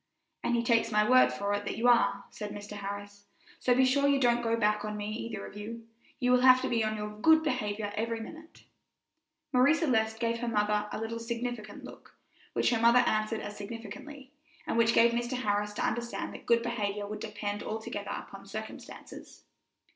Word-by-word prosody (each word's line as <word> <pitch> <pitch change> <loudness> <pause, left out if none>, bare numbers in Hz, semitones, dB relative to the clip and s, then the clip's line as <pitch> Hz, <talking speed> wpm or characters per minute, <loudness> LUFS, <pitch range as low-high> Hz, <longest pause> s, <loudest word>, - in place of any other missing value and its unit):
"And 240 - +1
he 235 - +1
takes 230 -1 +2
my 210 0 +3
word 255 0 +6
for 200 0 -2
it 205 0 -1
that - - -4
you 235 - +2
are," 240 -1 +4
said 210 -1 -6
Mr. 205 0 -8
Harris; 205 0 -7 0.3
"so 245 - +3
be 260 +1 +5
sure 280 +2 +3
you 280 -1 +3
don't 240 -2 +3
go 230 -1 0
back 210 -1 +1
on 210 0 -4
me 210 0 -4
either 220 -2 -5
of - - -11
you. 225 +2 -7 0.3
You 250 -1 +2
will 250 0 +5
have 255 0 +7
to - - -1
be 230 -2 +1
on 215 0 -1
your 210 0 -4
good 315 +10 +4
behavior 210 -7 -2
every 230 +1 -2
minute." 320 +8 -11 0.9
Marie 255 +5 +5
Celeste 225 -9 +1
gave 230 -1 0
her 240 - -3
mother 210 -1 +1
a - - -4
little 225 +1 -4
significant 235 -2 -5
look, - - -13 0.4
which - - +2
her 230 -2 +1
mother 235 +2 +6
answered 215 +1 0
as 205 - -7
significantly, 230 +6 -9 0.3
and - - -2
which 230 0 +3
gave 235 0 +6
Mr. 240 +2 -2
Harris 210 -3 -1
to 210 - -1
understand 235 +1 -3
that - - -11
good 235 0 +4
behavior 210 -4 -2
would 210 +1 -6
depend 205 -1 -4
altogether 220 0 -5
upon - - -7
circumstances. - - -9
230 Hz, 200 wpm, -30 LUFS, 210-240 Hz, 0.9 s, have